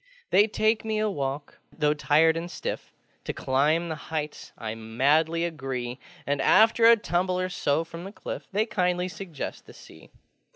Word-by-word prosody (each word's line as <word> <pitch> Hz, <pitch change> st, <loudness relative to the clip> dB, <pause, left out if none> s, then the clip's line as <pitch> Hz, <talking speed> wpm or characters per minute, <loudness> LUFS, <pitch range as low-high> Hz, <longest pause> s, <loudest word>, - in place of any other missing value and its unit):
They 205 Hz, +2 st, +6 dB
take 215 Hz, +1 st, +1 dB
me 220 Hz, -1 st, -1 dB
a 215 Hz, 0 st, +1 dB
walk: 140 Hz, -2 st, -4 dB
though 150 Hz, -2 st, +1 dB
tired 155 Hz, +2 st, +3 dB
and 165 Hz, +1 st, -4 dB
stiff, -, -, -5 dB, 0.3 s
To -, -, -3 dB
climb 150 Hz, +6 st, +1 dB
the 160 Hz, -, -3 dB, 0.2 s
heights 155 Hz, -2 st, -4 dB
I 110 Hz, -2 st, -4 dB
madly 145 Hz, +9 st, +1 dB
agree; 130 Hz, -6 st, -4 dB, 0.3 s
And, 140 Hz, -1 st, 0 dB
after 225 Hz, +6 st, +5 dB
a 230 Hz, 0 st, +8 dB
tumble 180 Hz, -2 st, 0 dB
or 185 Hz, 0 st, -1 dB
so 160 Hz, -3 st, 0 dB
from 165 Hz, +1 st, -9 dB
the 195 Hz, -, -7 dB
cliff, -, -, -7 dB
They 210 Hz, +2 st, +1 dB
kindly 180 Hz, -4 st, 0 dB
suggest 180 Hz, -6 st, -7 dB
the -, -, -13 dB
Sea. -, -, -15 dB
165 Hz, 170 wpm, -26 LUFS, 145-185 Hz, 0.3 s, a